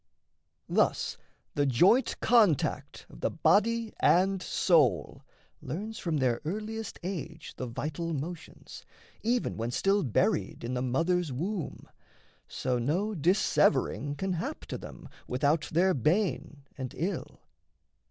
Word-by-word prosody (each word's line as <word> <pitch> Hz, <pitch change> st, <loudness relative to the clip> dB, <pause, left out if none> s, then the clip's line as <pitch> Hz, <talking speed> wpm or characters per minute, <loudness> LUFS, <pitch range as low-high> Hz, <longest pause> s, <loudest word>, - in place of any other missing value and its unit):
Thus -, -, +1 dB, 0.4 s
the 145 Hz, -1 st, +1 dB
joint 180 Hz, -, +3 dB
contact 215 Hz, -, +2 dB
of -, -, -14 dB
the -, -, +1 dB
body 230 Hz, +2 st, +2 dB
and 190 Hz, +1 st, +3 dB
soul 150 Hz, -, +2 dB, 0.4 s
Learns 210 Hz, -, -5 dB
from 165 Hz, -3 st, -1 dB
their 125 Hz, -4 st, +1 dB
earliest 215 Hz, +6 st, -4 dB
age 165 Hz, -3 st, -6 dB
the 125 Hz, -, -4 dB
vital 155 Hz, +7 st, -4 dB
motions, 160 Hz, +3 st, -7 dB, 0.4 s
Even 240 Hz, +2 st, 0 dB
when 115 Hz, +1 st, -2 dB
still 195 Hz, +11 st, +2 dB
buried 125 Hz, -, 0 dB
in 120 Hz, +2 st, -3 dB
the 125 Hz, -, -1 dB
mother's 165 Hz, +6 st, 0 dB
womb; 175 Hz, +7 st, -4 dB, 0.6 s
So 125 Hz, -1 st, -1 dB
no 180 Hz, -, 0 dB
dissevering 175 Hz, -3 st, +2 dB
can 190 Hz, +4 st, -1 dB
hap 170 Hz, -, -4 dB
to -, -, -4 dB
them, -, -, -10 dB, 0.2 s
Without 145 Hz, +5 st, +1 dB
their 185 Hz, +4 st, +3 dB
bane 155 Hz, -, 0 dB
and 130 Hz, 0 st, -6 dB
ill. 180 Hz, +6 st, -3 dB
170 Hz, 125 wpm, -29 LUFS, 140-195 Hz, 0.6 s, joint